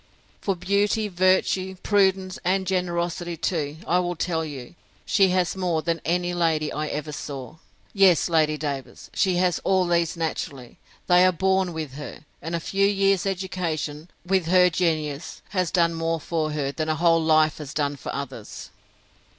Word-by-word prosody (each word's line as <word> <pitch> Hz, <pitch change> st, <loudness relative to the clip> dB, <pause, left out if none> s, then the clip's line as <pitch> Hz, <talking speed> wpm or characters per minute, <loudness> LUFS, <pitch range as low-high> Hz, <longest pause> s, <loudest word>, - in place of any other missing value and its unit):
For 195 Hz, -, -1 dB
beauty, 200 Hz, +4 st, +1 dB
virtue, 185 Hz, +1 st, +1 dB
prudence, 190 Hz, -2 st, +2 dB
and 190 Hz, +2 st, +1 dB
generosity 175 Hz, -2 st, -2 dB
too, 155 Hz, -3 st, -2 dB
I 180 Hz, -, +2 dB
will 175 Hz, 0 st, -1 dB
tell 165 Hz, -1 st, -1 dB
you, 140 Hz, -4 st, -8 dB, 0.3 s
she 195 Hz, -2 st, +4 dB
has 180 Hz, 0 st, +1 dB
more 175 Hz, -4 st, -1 dB
than 165 Hz, -2 st, -1 dB
any 175 Hz, +1 st, 0 dB
lady 160 Hz, -3 st, 0 dB
I 155 Hz, +1 st, -2 dB
ever 150 Hz, +1 st, -4 dB
saw. 140 Hz, -2 st, -7 dB, 0.4 s
Yes, 190 Hz, -5 st, +5 dB
Lady 155 Hz, -3 st, +2 dB
Davers, 140 Hz, -3 st, -6 dB
she 190 Hz, -2 st, +2 dB
has 180 Hz, -1 st, +2 dB
all 190 Hz, -1 st, +2 dB
these 170 Hz, -1 st, +1 dB
naturally; 140 Hz, -6 st, -4 dB, 0.3 s
they 180 Hz, 0 st, +5 dB
are 185 Hz, -, +5 dB
born 190 Hz, +1 st, +1 dB
with 155 Hz, -5 st, -5 dB
her; 150 Hz, +1 st, -9 dB, 0.2 s
and 165 Hz, +3 st, -3 dB
a -, -, -1 dB
few 195 Hz, +4 st, +1 dB
years' 195 Hz, -1 st, +2 dB
education, 170 Hz, -5 st, -3 dB, 0.2 s
with 185 Hz, -2 st, +1 dB
her 180 Hz, 0 st, +5 dB
genius, 160 Hz, -4 st, -2 dB
has 185 Hz, -4 st, 0 dB
done 170 Hz, -3 st, +2 dB
more 165 Hz, 0 st, -1 dB
for 155 Hz, -1 st, -2 dB
her, 140 Hz, -2 st, -1 dB
than 155 Hz, +2 st, -3 dB
a 155 Hz, -, +1 dB
whole 165 Hz, +1 st, +3 dB
life 155 Hz, -1 st, +3 dB
has 145 Hz, -2 st, -7 dB
done 145 Hz, -2 st, -1 dB
for 140 Hz, -, -6 dB
others. -, -, -7 dB
170 Hz, 165 wpm, -24 LUFS, 155-185 Hz, 0.4 s, Yes